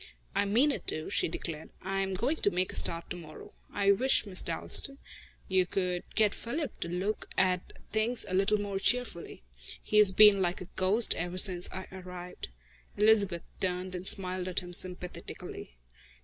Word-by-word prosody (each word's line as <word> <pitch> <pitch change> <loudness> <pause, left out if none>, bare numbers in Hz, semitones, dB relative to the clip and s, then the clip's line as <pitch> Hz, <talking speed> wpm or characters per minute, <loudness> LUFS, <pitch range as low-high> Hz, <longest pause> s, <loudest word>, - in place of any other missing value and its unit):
"I 200 - +1
mean 240 +9 +3
it - - -6
to," 155 - -4
she - - +1
declared. 160 -1 -6
"I 195 +1 -2
am 195 -1 -2
going 255 - -1
to - - +1
make 185 0 -2
a - - -7
start 170 0 +3
to - - -3
morrow. 155 -3 -12 0.2
I 200 -1 +2
wish, 255 +5 +3
Miss 185 -3 0
Dalstan, 275 -1 +3 0.5
you 185 -1 +1
could 180 -1 -2
get 215 -2 +2
Philip 280 +4 -5
to - - -4
look 185 +5 -3
at 185 -1 0 0.2
things 225 +2 0
a - - -5
little 195 +3 +2
more 200 -1 -3
cheerfully. 225 - -1 0.4
He 215 - -1
has 210 -2 +7
been 200 0 +6
like 175 -1 -1
a 185 - -7
ghost 200 +5 +4
ever 175 +2 -4
since 185 -2 +2
I 190 0 -7
arrived." 180 -1 -9 0.5
Elizabeth 205 -5 +3 0.2
turned 185 0 -3
and 180 +1 -6
smiled 185 -1 +2
at 185 - -1
him 175 0 -10
sympathetically. 180 - -3
190 Hz, 175 wpm, -30 LUFS, 180-210 Hz, 0.5 s, has